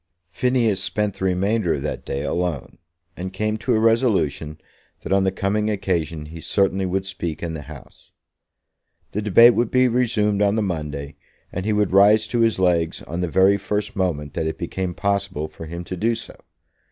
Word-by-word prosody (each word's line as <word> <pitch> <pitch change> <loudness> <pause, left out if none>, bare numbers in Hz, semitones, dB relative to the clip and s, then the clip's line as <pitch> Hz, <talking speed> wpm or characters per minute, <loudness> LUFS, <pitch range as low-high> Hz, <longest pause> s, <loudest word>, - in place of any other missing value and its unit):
Phineas 120 -6 +1
spent 105 -1 -1
the 95 - -1
remainder 95 0 +1
of 70 - -5
that 75 - -4
day 70 +1 -3
alone, 85 -6 -3 0.4
and 95 +1 -5
came 110 +3 -1
to 120 +2 0
a - - +2
resolution 105 - +1 0.4
that - - -1
on 95 0 +3
the 95 - +2
coming 105 +3 -1
occasion 85 -7 -2
he 80 +2 -9
certainly 95 +2 +1
would 95 +1 -1
speak 85 -5 -5
in 85 -1 -3
the 80 - -5
House. 75 -1 -13 1.0
The 105 - -2
debate 115 +4 +7
would 120 -1 +1
be 130 0 +4
resumed 110 -4 +1
on 100 0 +3
the 110 - +1
Monday, 75 -6 -4 0.3
and 95 +1 -4
he 110 - +1
would 105 -2 +1
rise 105 +3 +5
to 120 - 0
his 115 -1 +3
legs 85 -3 +1
on 85 +3 -4
the 90 - 0
very 95 +4 +4
first 105 +2 -3
moment 80 -7 -2
that 80 - -2
it 80 - -3
became 90 0 -4
possible 100 -6 -1
for 80 +1 -10
him 85 +2 -6
to 90 - -6
do 115 +6 +1
so. 115 - -8
95 Hz, 190 wpm, -22 LUFS, 85-105 Hz, 1.0 s, debate